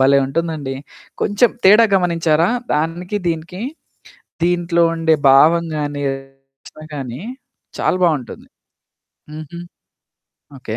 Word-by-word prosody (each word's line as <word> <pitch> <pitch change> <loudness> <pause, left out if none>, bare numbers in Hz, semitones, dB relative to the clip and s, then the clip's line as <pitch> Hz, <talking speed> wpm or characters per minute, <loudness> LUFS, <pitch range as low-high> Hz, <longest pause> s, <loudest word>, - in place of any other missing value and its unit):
భలే! 135 +1 +5
ఉంటుందండి. 155 -2 -3 0.5
కొంచెం 210 +4 +2
తేడా 210 +4 +7
గమనించారా? 170 -3 +2 0.2
దానికి, 165 +6 -2
దీనికి. 170 +2 -3 0.8
దీంట్లో 175 0 +1
ఉండే 165 -1 +2
భావం 160 +5 +5
గానీ, 145 -1 -3
రచన 135 +2 -11
కానీ 130 -3 -6 0.6
చాలా - - +1
బావుంటుంది. 150 -9 -1 0.9
హుహు. 155 +2 -9 1.0
ఓకే. 115 -3 -6
160 Hz, 95 wpm, -18 LUFS, 135-170 Hz, 1.0 s, తేడా